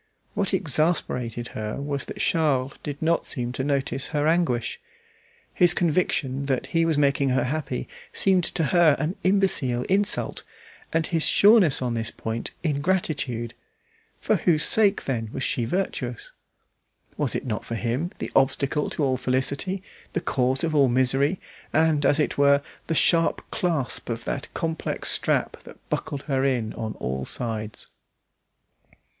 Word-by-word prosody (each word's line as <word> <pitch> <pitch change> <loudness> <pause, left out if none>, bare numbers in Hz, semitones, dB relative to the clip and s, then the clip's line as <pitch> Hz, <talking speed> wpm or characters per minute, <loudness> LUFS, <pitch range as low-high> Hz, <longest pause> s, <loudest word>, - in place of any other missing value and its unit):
What 195 - 0
exasperated 150 - 0
her 110 +3 -5
was 140 -1 -2
that - - -8
Charles 140 -4 +1
did 145 -1 -6
not 165 +1 +2
seem 125 -4 -1
to 130 - -3
notice 135 -1 -1
her 150 -2 -1
anguish. 160 - +1 0.7
His 175 -2 +4
conviction 145 -5 0
that 130 -3 0
he 165 0 +3
was 160 -2 +1
making 140 -1 +2
her 130 0 +2
happy 135 -1 -3 0.2
seemed 190 -2 +2
to 165 - -1
her 170 -5 +6
an 160 +5 -2
imbecile 185 -11 +2
insult, 200 +5 0 0.5
and 165 0 +1
his 165 -2 -1
sureness 200 - +5
on 120 -2 -1
this 115 0 -2
point 115 0 -5
ingratitude. 145 -7 -1 0.7
For - - +1
whose 155 -3 +2
sake, 210 -2 +3
then 115 -5 -2
was 130 - -4
she 120 - 0
virtuous? 125 - -3 0.8
Was - - -1
it - - -3
not 110 -4 -3
for 115 - -5
him, 120 +9 -1
the - - -5
obstacle 140 +2 +1
to 150 - -2
all 130 -2 +1
felicity, 135 +9 +1 0.3
the - - 0
cause 130 +1 0
of 165 -1 0
all 140 -3 +4
misery, 135 +7 +2 0.3
and, 155 -3 +3
as 145 +2 +3
it 150 - 0
were, 140 0 +5 0.2
the 165 - 0
sharp 165 +1 +3
clasp 165 - -1
of 115 -1 -4
that 140 - -4
complex 165 -1 -2
strap - - 0
that - - -13
bucked 140 -1 -3
her 135 -2 0
in 125 -5 0
on 110 -1 -4
all 65 +1 -3
sides. 110 - -3
140 Hz, 150 wpm, -25 LUFS, 125-165 Hz, 0.8 s, her